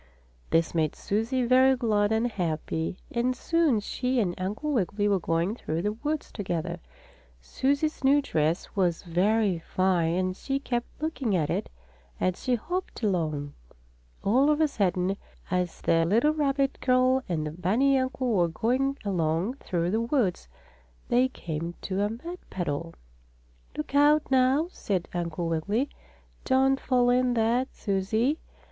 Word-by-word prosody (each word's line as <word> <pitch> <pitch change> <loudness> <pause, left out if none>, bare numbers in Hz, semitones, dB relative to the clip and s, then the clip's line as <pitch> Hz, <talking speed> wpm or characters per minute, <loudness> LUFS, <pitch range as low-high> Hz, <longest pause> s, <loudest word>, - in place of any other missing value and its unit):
This 165 0 +2
made 160 -3 0
Susie 230 +5 -1
very 260 +2 +5
glad 215 -4 +1
and 220 +1 +2
happy, 165 -5 -2
and 245 +2 0
soon 320 -4 +2
she 250 +4 -1
and 185 -6 +1
Uncle 215 +11 -2
Wiggily 205 -2 0
were 200 -2 +2
going 165 +3 0
through 165 -7 -3
the 210 - +1
woods 295 +7 -3
together. 175 -4 -3 0.6
Susie's 280 - -1
new 275 +2 +5
dress 160 - -1
was 180 -4 +1
very 190 +2 +1
fine 175 -1 +1
and 185 0 0
she 270 +7 -2
kept 245 -3 -2 0.2
looking 270 -10 -1
at 155 -4 0
it - - -2 0.5
as 185 -1 -1
she 250 - +1
hopped 350 +3 -4
along. 155 -8 -1 0.7
All 260 +8 +4
of 300 0 +2
a 315 - +4
sudden, 190 -6 0 0.3
as 180 -1 -1
the 165 0 +3
little 230 - +3
rabbit 275 -2 0
girl 255 +1 +3
and 160 -3 -1
the 150 - -3
bunny 215 - +2
uncle 260 -1 -1
were 175 -4 +3
going 260 +10 0
along 180 - 0
through 175 -7 -2
the 220 +2 +1
woods, 230 - 0 0.6
they 250 +2 +4
came 170 -8 -5
to 190 +1 -1
a 205 - +1
mud 335 +11 -7
puddle. 145 - -3 0.8
"Look 150 - -5
out, 290 +1 +4
now!" 265 +5 +3
said 190 - -2
Uncle 170 -1 -2
Wiggily. 200 - 0 0.5
"Don't 270 0 +3
fall 245 -2 +2
in 250 0 +2
that, 235 +3 +1
Susie." 220 +9 0
215 Hz, 150 wpm, -27 LUFS, 175-260 Hz, 0.8 s, very